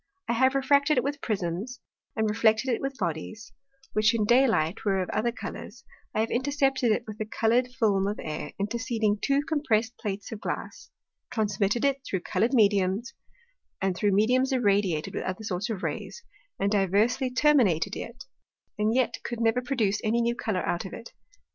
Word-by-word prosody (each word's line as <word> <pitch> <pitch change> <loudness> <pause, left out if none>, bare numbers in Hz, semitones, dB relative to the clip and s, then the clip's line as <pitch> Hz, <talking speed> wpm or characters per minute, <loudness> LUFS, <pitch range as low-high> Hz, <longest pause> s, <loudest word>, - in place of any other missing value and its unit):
I - - +1
have 260 +3 +3
refracted 280 +2 +3
it 250 - +3
with 285 +1 -3
Prisms, 200 +3 -3 0.4
and 220 -1 +1
reflected 220 +3 +2
it - - -2
with 270 0 -3
Bodies, 195 +3 -4 0.4
which 215 +2 +3
in 215 -2 +1
Day 255 +5 +5
light 165 -4 0
were 195 -2 +1
of 185 - -2
other 235 +3 0
Colours; 235 +1 -8 0.3
I 215 - +2
have 225 - -1
intercepted 270 -2 +1
it 215 - +1
with 215 -1 -9
the 215 - -2
colour'd 235 +3 +1
Film 215 -6 +1
of 205 - -3
Air 150 -1 -5
interceding 220 0 0
two 280 +1 +2
compressed 245 -7 0
Plates 200 -1 -4
of 220 -2 -7
Glass; - - -5 0.4
transmitted 210 +1 0
it 275 -1 +1
through 190 -8 -3
colour'd 235 +8 0
Mediums, 205 +1 +2 0.7
and 190 -2 0
through 205 +2 +1
Mediums 250 +7 +3
irradiated 200 -10 +1
with - - -3
other 185 +4 -4
sorts 200 +2 -3
of 205 -4 -4
Rays, 475 - -4 0.4
and 200 - +1
diversly 210 +6 +2
terminated 250 - +3
it, 245 +3 -7 0.6
and 215 +2 +2
yet 255 -2 +1
could 240 -1 -4
never 230 +2 +2
produce 230 -6 0
any 225 +2 +1
new 235 0 +1
Colour 215 -6 -2
out 175 - -1
of 190 - -8
it. 230 - -9
220 Hz, 180 wpm, -27 LUFS, 200-250 Hz, 0.7 s, Day